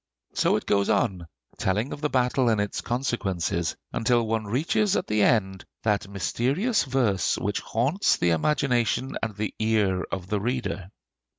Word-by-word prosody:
So - - +2
it - - -2
goes 100 -1 +2
on, 95 -8 0 0.3
telling 105 +7 0
of 145 - -8
the 150 - 0
battle 125 -1 +2
and 110 -2 +2
its 105 -1 -2
consequences, 100 -9 -1 0.2
until 120 0 +2
one 110 0 -1
reaches 165 - +1
at - - 0
the 105 0 +1
end 95 -3 +2 0.2
that 105 -3 +1
mysterious 130 - 0
verse 120 - +1
which 100 +1 -1
haunts 135 - +1
the 85 - +2
imagination 125 - +1
and 110 -2 -3
the 105 +1 -3
ear 105 -4 +2
of 95 -2 -3
the 100 +1 -2
reader. 100 -6 -3
110 Hz, 160 wpm, -26 LUFS, 100-125 Hz, 0.3 s, So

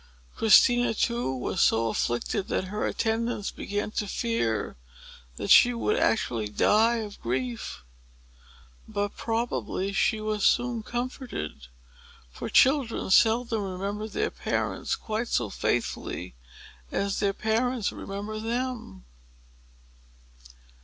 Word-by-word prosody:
Christina, 240 +2 +5
too, 235 - 0
was 130 -1 -2
so 115 0 +3
afflicted 120 - -1
that - - -1
her 210 - -1
attendants 225 -1 -1
began 205 +1 -3
to 210 - -2
fear 195 - -1 0.6
that - - -3
she 245 0 +7
would 420 - 0
actually 120 - +1
die 220 - +3
of 215 -3 -6
grief. 125 - -3 1.0
But 205 0 -2
probably 225 -4 -2
she 215 +2 +2
was 215 -1 -2
soon 240 -2 +2
comforted; 240 - -5 0.6
for - - -6
children 260 -7 +3
seldom 225 +1 +4
remember 200 +2 -4
their 215 - -2
parents - - -2
quite 220 +2 -3
so 110 - 0
faithfully 90 +1 -2 0.6
as 200 0 -1
their 200 -2 +1
parents 225 +2 0
remember 205 +2 -6
them. 235 - -4
215 Hz, 110 wpm, -27 LUFS, 195-235 Hz, 1.0 s, she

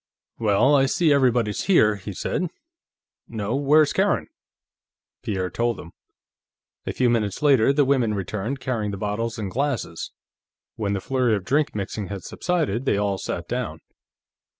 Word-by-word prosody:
"Well, 115 +6 +3
I 135 -1 +4
see 155 +2 +3
everybody's 120 -6 +2
here," 110 - +4
he 100 +1 -7
said. 180 - -2 0.8
"No; 110 +1 -3
where's 145 +2 +4
Karen?" - - +1 0.9
Pierre 95 -4 -2
told 120 0 -1
him. 85 - -10 1.0
A - - 0
few 125 - +1
minutes 115 -1 0
later 135 -4 +5
the 140 0 +3
women 125 -6 +2
returned, 105 +7 -3
carrying 120 -5 -2
bottles 105 +3 -3
and 100 -4 -4
glasses; 130 - -2 0.6
when 100 -2 -2
the 95 - -2
flurry 125 -2 +1
of 100 -3 -5
drink 145 +4 +1
mixing 100 0 -4
had 100 -1 -6
subsided, 155 - -1
they 105 - +2
all 100 -1 0
sat - - -4
down. - - -3
115 Hz, 150 wpm, -24 LUFS, 100-135 Hz, 1.0 s, later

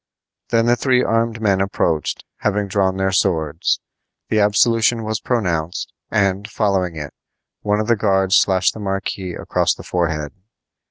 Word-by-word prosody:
Then 115 0 +2
the 120 0 +4
three 125 +1 +2
armed 115 0 0
men 100 -3 +2
approached, 85 -5 -1
having 105 -1 -1
drawn 95 -1 0
their 95 0 +1
swords. 80 -5 +1 0.5
The 110 - +2
absolution 115 +3 +3
was 110 0 -2
pronounced; 90 -8 -2 0.2
and, 100 0 0
following 95 -5 0
it, 75 -2 -6 0.5
one 105 0 0
of 110 - 0
the 115 +1 +3
guards 95 -3 +2
slashed 95 -2 +3
the - - -9
marquis 95 -2 -3
across - - 0
the - - -11
forehead. 80 -4 -2
100 Hz, 150 wpm, -20 LUFS, 90-110 Hz, 0.5 s, the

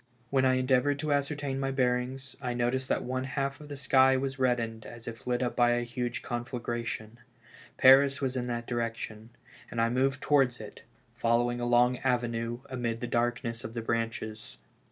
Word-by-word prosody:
When 135 -1 +3
I 130 0 +4
endeavored 130 +2 +2
to 150 0 0
ascertain 140 -1 -1
my 135 0 -1
bearings, 130 0 -1
I 125 -2 -2
noticed 125 +2 0
that - - +1
one 130 +1 -2
half 140 +1 -3
of 150 - -10
the 145 - -6
sky 130 -1 +4
was 135 0 -3
reddened 115 -3 0
as 120 0 -11
if 115 +1 -8
lit 125 0 +1
up 125 - -2
by 120 -1 +4
a 120 0 0
huge 120 0 -3
conflagration; 120 -2 -4 0.6
Paris 135 +1 +7
was 130 -2 -1
in 125 -1 -2
that 120 -1 -3
direction, 115 -2 -4 0.4
and 120 - -4
I 115 0 +3
moved 130 +2 +1
towards 135 -5 +2
it, 110 - -10 0.3
fol 115 -1 +2
lowing 120 0 -2
a 120 - -1
long 120 +1 +4
avenue, 120 -2 -1
amid 120 -3 -3
the 120 - -3
darkness 120 -1 -1
of 110 +2 -7
the 115 - -3
branches. 115 -1 -3
125 Hz, 185 wpm, -29 LUFS, 120-130 Hz, 0.6 s, Paris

